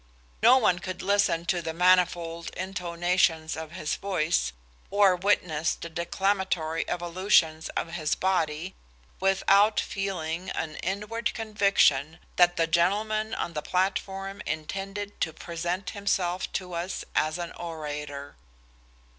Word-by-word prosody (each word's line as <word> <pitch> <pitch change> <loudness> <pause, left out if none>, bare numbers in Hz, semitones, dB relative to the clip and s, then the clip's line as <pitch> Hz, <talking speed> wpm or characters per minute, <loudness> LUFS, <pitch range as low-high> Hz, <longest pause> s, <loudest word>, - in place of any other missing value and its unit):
No 260 - +8
one 195 -8 +3
could 185 -1 -6
listen 200 -4 +2
to 175 0 0
the 160 -1 -4
manifold 175 -2 +2
intonations 175 -3 0
of 160 0 -7
his 155 -4 -2
voice, 155 - 0 0.4
or 200 -2 +5
witness 175 -4 +1
the 170 - -8
declamatory 170 -1 -1
evolutions 175 -2 +2
of 165 - -2
his 155 -3 0
body, 175 -2 0 0.5
without 195 +2 +4
feeling 180 -3 -3
an 155 -1 -4
inward 210 +4 -2
conviction 200 - +2 0.2
that 175 -1 +5
the 165 - +3
gentleman 210 +6 +1
on 170 - -3
the 150 - -3
platform 195 +2 -2
intended 195 +6 -4
to 160 - 0
present 175 +3 -4
himself 185 -3 -1
to 180 -2 -4
us 175 +2 -3
as 155 +2 +1
an 175 -1 -5
orator. 150 -4 -6
180 Hz, 120 wpm, -27 LUFS, 165-195 Hz, 0.5 s, No